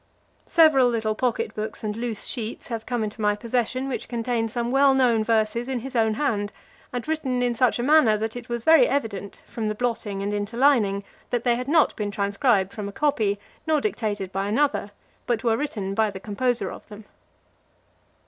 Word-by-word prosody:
Several 310 Hz, -6 st, +5 dB
little 220 Hz, -2 st, 0 dB
pocket 245 Hz, +1 st, -1 dB
books 215 Hz, +1 st, -5 dB
and 210 Hz, -1 st, -2 dB
loose 230 Hz, -2 st, -3 dB
sheets 230 Hz, -2 st, -5 dB
have 225 Hz, -2 st, -5 dB
cone 245 Hz, -3 st, -1 dB
into 215 Hz, +1 st, -5 dB
my 210 Hz, 0 st, +2 dB
possession, 245 Hz, +3 st, -1 dB
which 265 Hz, -, -4 dB
contain 235 Hz, -1 st, -1 dB
some 235 Hz, +1 st, -2 dB
well 270 Hz, 0 st, +5 dB
known 240 Hz, -4 st, +3 dB
verses 225 Hz, +1 st, +1 dB
in 260 Hz, -3 st, -2 dB
his 265 Hz, +1 st, -8 dB
own 220 Hz, -2 st, +2 dB
hand, 215 Hz, -7 st, -1 dB, 0.4 s
and 245 Hz, +1 st, -4 dB
written 270 Hz, -6 st, -1 dB
in 245 Hz, -1 st, +1 dB
such 240 Hz, 0 st, +2 dB
a 240 Hz, -, -2 dB
manner, 275 Hz, -6 st, +5 dB
that 220 Hz, +2 st, -3 dB
it 245 Hz, -1 st, -8 dB
was 235 Hz, -1 st, -3 dB
very 320 Hz, -4 st, +6 dB
evident, 220 Hz, -8 st, -3 dB
from 225 Hz, -2 st, -4 dB
the 215 Hz, -, -2 dB
blotting 220 Hz, -4 st, -2 dB
and 205 Hz, +1 st, -2 dB
interlining, 205 Hz, -1 st, +2 dB, 0.3 s
that 240 Hz, -1 st, -1 dB
they 240 Hz, -2 st, +3 dB
had 250 Hz, +2 st, -4 dB
not 310 Hz, +1 st, +3 dB
been 210 Hz, -1 st, -2 dB
transcribed 200 Hz, 0 st, +1 dB
from 205 Hz, -2 st, -5 dB
a -, -, -8 dB
copy, 215 Hz, -6 st, 0 dB, 0.3 s
nor 310 Hz, -1 st, +3 dB
dictated 210 Hz, -, -2 dB
by 195 Hz, +1 st, -2 dB
another, 250 Hz, 0 st, +1 dB, 0.4 s
but 235 Hz, -3 st, 0 dB
were 230 Hz, -2 st, +3 dB
written 215 Hz, -8 st, -3 dB
by 220 Hz, +1 st, +2 dB
the 195 Hz, -1 st, -7 dB
composer 235 Hz, +5 st, -1 dB
of -, -, -11 dB
them. 210 Hz, 0 st, -11 dB
230 Hz, 195 wpm, -24 LUFS, 210-255 Hz, 0.4 s, very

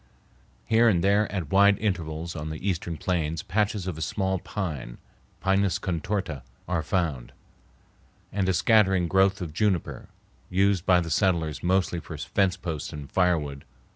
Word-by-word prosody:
Here 115 Hz, +1 st, +4 dB
and 90 Hz, -5 st, +2 dB
there 100 Hz, +2 st, +3 dB
at 90 Hz, -7 st, -4 dB
wide 100 Hz, +1 st, +5 dB
intervals 85 Hz, -5 st, -3 dB
on 75 Hz, -1 st, -5 dB
the 80 Hz, +5 st, -5 dB
eastern 85 Hz, -3 st, -2 dB
plains 80 Hz, -4 st, -1 dB
patches 105 Hz, 0 st, 0 dB
of 90 Hz, -4 st, -4 dB
a -, -, -6 dB
small 95 Hz, +3 st, -1 dB
pine 75 Hz, -, -5 dB, 0.4 s
(Pinus 95 Hz, -1 st, +2 dB
contorta) 90 Hz, -4 st, -3 dB, 0.3 s
are 85 Hz, -1 st, 0 dB
found, 80 Hz, -9 st, -2 dB, 1.0 s
and 95 Hz, -1 st, 0 dB
a -, -, +3 dB
scattering 95 Hz, 0 st, +4 dB
growth 95 Hz, +2 st, +3 dB
of 80 Hz, -4 st, -5 dB
juniper, 95 Hz, -1 st, -1 dB, 0.4 s
used 95 Hz, -1 st, +1 dB
by 90 Hz, -2 st, +5 dB
the 85 Hz, -1 st, -5 dB
settlers 80 Hz, -4 st, +1 dB
mostly 90 Hz, -1 st, +1 dB
for -, -, -8 dB
fence 95 Hz, -2 st, 0 dB
posts 80 Hz, -4 st, -5 dB
and 75 Hz, -3 st, -8 dB
firewood. 80 Hz, -7 st, +1 dB
90 Hz, 150 wpm, -26 LUFS, 80-95 Hz, 1.0 s, wide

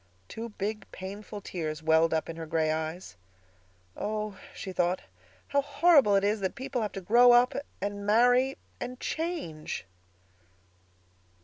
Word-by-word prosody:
Two 230 Hz, +1 st, -6 dB
big, 210 Hz, +1 st, -5 dB
painful 205 Hz, +2 st, -7 dB
tears 160 Hz, -4 st, -4 dB
welled 160 Hz, +1 st, +4 dB
up 160 Hz, -1 st, 0 dB
in 165 Hz, -, -6 dB
her 165 Hz, -1 st, -7 dB
gray 160 Hz, -1 st, +1 dB
eyes. 160 Hz, -, -4 dB, 0.8 s
"Oh," 215 Hz, -1 st, -3 dB, 0.2 s
she 190 Hz, -, -7 dB
thought, 180 Hz, +1 st, +1 dB, 0.5 s
"how 280 Hz, -, +3 dB
horrible 285 Hz, -5 st, +5 dB
it 195 Hz, -, +3 dB
is 210 Hz, +2 st, +1 dB
that 190 Hz, -1 st, -2 dB
people 260 Hz, -1 st, -3 dB
have 210 Hz, -, -2 dB
to 195 Hz, -, -5 dB
grow 240 Hz, +6 st, +6 dB
up—and 240 Hz, -5 st, +1 dB
marry—and 245 Hz, +3 st, +1 dB
_change! 310 Hz, -, -3 dB
205 Hz, 130 wpm, -29 LUFS, 170-245 Hz, 0.8 s, grow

